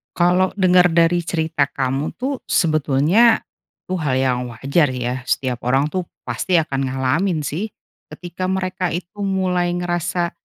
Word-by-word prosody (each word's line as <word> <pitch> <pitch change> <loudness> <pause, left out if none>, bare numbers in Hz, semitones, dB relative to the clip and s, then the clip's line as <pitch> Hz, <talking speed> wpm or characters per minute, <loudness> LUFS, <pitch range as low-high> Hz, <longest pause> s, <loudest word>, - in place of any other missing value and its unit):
Kalau 180 +2 +2
denger 180 -2 +5
dari 170 +1 +4
cerita 160 -4 0
kamu 135 +2 -2
tuh, 265 +1 -3
sebetulnya, 155 - +3 0.5
itu 185 - -2
hal 140 -5 0
yang 130 -1 +1
wajar 140 +7 +1
ya. 125 0 -3
Setiap 125 -2 -1
orang 135 +3 +2
tuh 185 -1 -1 0.2
pasti 185 - -1
akan 140 -4 -2
ngalamin 150 +7 0
sih. 175 +10 -3 0.4
Ketika 180 +1 -6
mereka 185 -1 -1
itu 180 +4 -6
mulai 185 -3 0
ngerasa, 175 0 -1
175 Hz, 140 wpm, -20 LUFS, 140-185 Hz, 0.5 s, denger